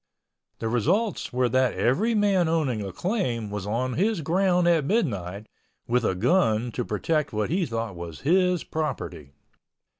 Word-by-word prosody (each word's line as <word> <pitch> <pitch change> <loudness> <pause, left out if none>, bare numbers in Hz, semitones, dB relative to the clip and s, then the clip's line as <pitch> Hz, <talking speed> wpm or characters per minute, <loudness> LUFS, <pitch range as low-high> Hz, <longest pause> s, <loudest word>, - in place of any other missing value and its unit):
The 115 - -3
results 170 - 0
were 125 0 +1
that 130 +1 +2
every 210 - +1
man 200 -4 +3
owning 145 -9 0
a 100 -1 -5
claim 120 - -2
was 105 -1 -4
on 125 +4 -1
his 200 - +1
ground 180 +2 +2
at 165 -3 +4
midnight 105 - -1 0.4
with 125 +1 +1
a 95 - +1
gun 120 - +2
to 125 - -2
protect 150 +8 -1
what 105 +4 -1
he 175 -1 +1
thought 115 -4 -3
was 85 -2 -8
his 180 +3 +2
property. 140 - -4
130 Hz, 155 wpm, -25 LUFS, 110-180 Hz, 0.4 s, at